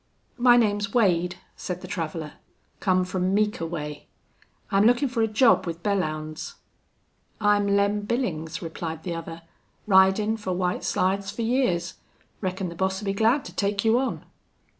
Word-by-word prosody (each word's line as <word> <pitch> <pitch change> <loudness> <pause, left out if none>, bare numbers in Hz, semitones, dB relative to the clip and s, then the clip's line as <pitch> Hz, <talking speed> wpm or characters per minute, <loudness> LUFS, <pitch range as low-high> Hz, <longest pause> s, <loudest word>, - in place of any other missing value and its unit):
"My 245 0 +6
name's 205 -2 +1
Wade," 180 -6 +2 0.2
said 180 0 -5
the - - -8
traveler. 160 -2 -4 0.5
"Come 185 -1 +2
from 185 +1 -1
Meeker 210 -5 0
way. 150 -3 -6 0.6
I'm 195 +1 +4
lookin' 245 +4 +3
for 240 -2 -1
a 225 - +3
job 220 -2 +4
with 170 0 -5
Belllounds." 155 -6 -2 0.8
"I'm 205 -1 +3
Lem 200 +1 +2
Billings," 165 -10 -2
replied 160 -1 -5
the 175 - -3
other. 165 0 -7 0.4
"Ridin' 200 +2 +4
fer 190 -4 -3
White 180 0 -1
Slides 195 +1 0
fer 215 +3 -4
years. 190 -8 0 0.4
Reckon 185 -1 -2
the 170 - -9
boss'll 190 +3 -1
be 195 - 0
glad 225 +7 +2
to - - -9
take 200 +1 0
you 225 +2 +4
on." 265 - -3
195 Hz, 155 wpm, -25 LUFS, 170-215 Hz, 0.8 s, My